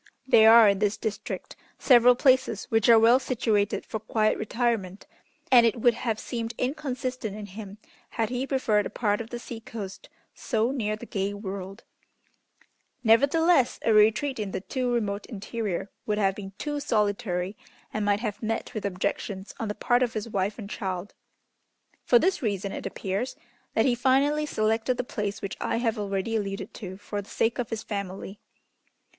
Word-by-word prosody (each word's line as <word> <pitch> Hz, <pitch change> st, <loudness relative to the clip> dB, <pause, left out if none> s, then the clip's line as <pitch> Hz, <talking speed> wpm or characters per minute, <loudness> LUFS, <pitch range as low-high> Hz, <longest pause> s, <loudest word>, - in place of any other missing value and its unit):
There 225 Hz, -4 st, +7 dB
are 230 Hz, -1 st, +9 dB
in 200 Hz, -1 st, +1 dB
this 210 Hz, 0 st, +1 dB
district 215 Hz, -2 st, -5 dB, 0.2 s
several 245 Hz, -1 st, +6 dB
places 260 Hz, -5 st, +2 dB
which 225 Hz, 0 st, +3 dB
are 230 Hz, -, +9 dB
well 230 Hz, +3 st, +6 dB
situated 225 Hz, -6 st, 0 dB
for 220 Hz, -, -4 dB
quiet 215 Hz, 0 st, +1 dB
retirement, 220 Hz, -4 st, -2 dB, 0.5 s
and 245 Hz, -2 st, +8 dB
it 230 Hz, 0 st, +2 dB
would 240 Hz, +1 st, +4 dB
have 225 Hz, -2 st, -2 dB
seemed 230 Hz, 0 st, -4 dB
inconsistent 255 Hz, -5 st, -3 dB
in 210 Hz, -, -6 dB
him 200 Hz, 0 st, -9 dB, 0.3 s
had 225 Hz, -2 st, -1 dB
he 255 Hz, +2 st, -2 dB
preferred 220 Hz, -7 st, +1 dB
a -, -, -10 dB
part 210 Hz, -2 st, 0 dB
of 230 Hz, -, -8 dB
the 240 Hz, -, -5 dB
sea 235 Hz, -1 st, -8 dB
coast 205 Hz, -4 st, -8 dB, 0.2 s
so 230 Hz, 0 st, 0 dB
near 215 Hz, -6 st, -1 dB
the 215 Hz, -, -10 dB
gay 200 Hz, -2 st, -2 dB
world; 195 Hz, 0 st, -7 dB, 1.2 s
nevertheless, 280 Hz, +5 st, +4 dB
a 225 Hz, -, +4 dB
retreat 220 Hz, +5 st, +3 dB
in 210 Hz, -2 st, -2 dB
the 190 Hz, -, -3 dB
too 250 Hz, +4 st, -2 dB
remote 210 Hz, -4 st, -1 dB
interior 205 Hz, -3 st, -4 dB, 0.2 s
would 210 Hz, -1 st, 0 dB
have 195 Hz, -2 st, +2 dB
been 195 Hz, 0 st, -8 dB
too 295 Hz, -1 st, -3 dB
solitary, 205 Hz, -5 st, -1 dB, 0.4 s
and 215 Hz, -, -1 dB
might 205 Hz, 0 st, +1 dB
have 215 Hz, -2 st, -4 dB
met 225 Hz, 0 st, -3 dB
with 215 Hz, -2 st, -4 dB
objections 190 Hz, +1 st, -3 dB
on 225 Hz, -, -2 dB
the 210 Hz, -, -3 dB
part 245 Hz, +3 st, +2 dB
of 245 Hz, -2 st, +1 dB
his 215 Hz, 0 st, -3 dB
wife 200 Hz, -1 st, -1 dB
and 210 Hz, -3 st, -8 dB
child. 185 Hz, -1 st, -4 dB, 0.9 s
For 245 Hz, -, +6 dB
this 370 Hz, +9 st, +1 dB
reason, 200 Hz, -4 st, -2 dB
it -, -, -5 dB
appears, 195 Hz, +5 st, -3 dB, 0.4 s
that 225 Hz, -, +3 dB
he 255 Hz, -, +3 dB
finally 275 Hz, +5 st, +2 dB
selected 225 Hz, +1 st, 0 dB
the -, -, -1 dB
place 210 Hz, -4 st, -4 dB
which 195 Hz, -, -4 dB
I -, -, 0 dB
have 230 Hz, -2 st, 0 dB
already 200 Hz, +2 st, -2 dB
alluded 195 Hz, -2 st, -4 dB
to 190 Hz, -2 st, -8 dB
for 205 Hz, 0 st, -5 dB
the 200 Hz, -, -16 dB
sake 230 Hz, +2 st, 0 dB
of 240 Hz, -, -2 dB
his 225 Hz, -1 st, -4 dB
family. 200 Hz, -1 st, -5 dB
220 Hz, 175 wpm, -27 LUFS, 200-240 Hz, 1.2 s, are